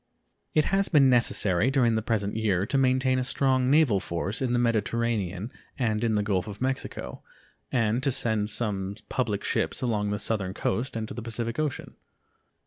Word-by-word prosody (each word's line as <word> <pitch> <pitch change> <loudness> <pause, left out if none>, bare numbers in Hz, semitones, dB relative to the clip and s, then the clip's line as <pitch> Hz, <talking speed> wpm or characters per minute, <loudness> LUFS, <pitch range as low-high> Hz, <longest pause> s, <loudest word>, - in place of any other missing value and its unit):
It 155 - +4
has 195 0 +2
been 140 -5 +5
necessary 110 -3 +2
during 130 -4 +2
the 110 - 0
present 105 -3 -1
year 100 -4 +1
to 125 - -3
maintain 130 0 +2
a - - 0
strong 130 0 +1
naval 140 -9 +4
force 90 +6 -3
in 130 -2 0
the 120 - +2
Mediterranean 115 -3 -1 0.3
and 110 -3 0
in 115 -2 +1
the 105 - +1
Gulf 100 -1 -1
of 105 -1 -8
Mexico, 130 - -4 0.5
and 115 -1 +1
to 140 0 +1
send 110 -4 +1
some 100 -3 -1
public 105 -6 -1
ships - - -1
along 105 -4 0
the 105 - -1
southern 100 -3 -1
coast 115 +7 -2
and 110 -1 -3
to - - -7
the 120 - -6
Pacific 115 +2 -2
Ocean. 150 -3 -3
115 Hz, 180 wpm, -27 LUFS, 105-130 Hz, 0.5 s, been